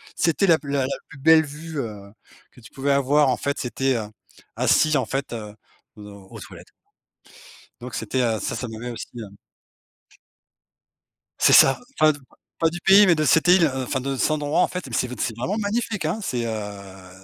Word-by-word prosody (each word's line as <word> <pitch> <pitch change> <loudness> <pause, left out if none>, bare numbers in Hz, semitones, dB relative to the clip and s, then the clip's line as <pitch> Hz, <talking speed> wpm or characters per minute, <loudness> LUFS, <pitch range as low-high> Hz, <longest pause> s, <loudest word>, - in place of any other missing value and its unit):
c'était 170 +4 +1
la 165 -3 +4
p 145 - -13
la 140 -1 0
la 130 - -3
plus 150 - -14
belle 160 +2 +5
vue, 150 +1 -8
heu, 105 -5 -7 0.4
que 125 - -19
tu 110 - -15
pouvais 140 +1 -2
avoir 140 +1 +3
en 125 - 0
fait, 140 0 -3
c'était, 130 +1 -1
heu, 110 -2 -3 0.5
assis, 155 -1 +3
en 130 - -1
fait, 135 +3 -4
heu, 105 -3 -7 0.4
dans 105 -1 -12
aux - - -10
toilettes - - -12 1.1
donc, 125 0 -8
c'était, 120 +4 -2
heu, 115 -3 0
ça - - -3
ça 125 - -5
m'avait 115 +2 -7
aussi, 120 - -7
heu 110 - -7 2.1
C'est - - +4
ça, 135 - +7 0.2
enfin, 155 0 +6 0.5
pas 165 - +2
du 175 - -6
pays, 195 +3 +6
mais 175 - +5
de 155 -1 -1
cette 165 +4 +3
île, 175 -4 +5
enfin 130 +1 -3
de 135 +1 -3
cet 130 - 0
endroit, 150 +2 0
en - - +3
fait, 180 -5 -6
mais 125 - -11
c'est 125 - 0
v 125 - -6
c'est 115 0 -3
vraiment 155 - -3
magnifique, 215 -2 -2
hein, 170 +8 -2
c'est, 120 -8 -2
heu, 100 -4 -7
135 Hz, 200 wpm, -23 LUFS, 115-160 Hz, 2.1 s, ça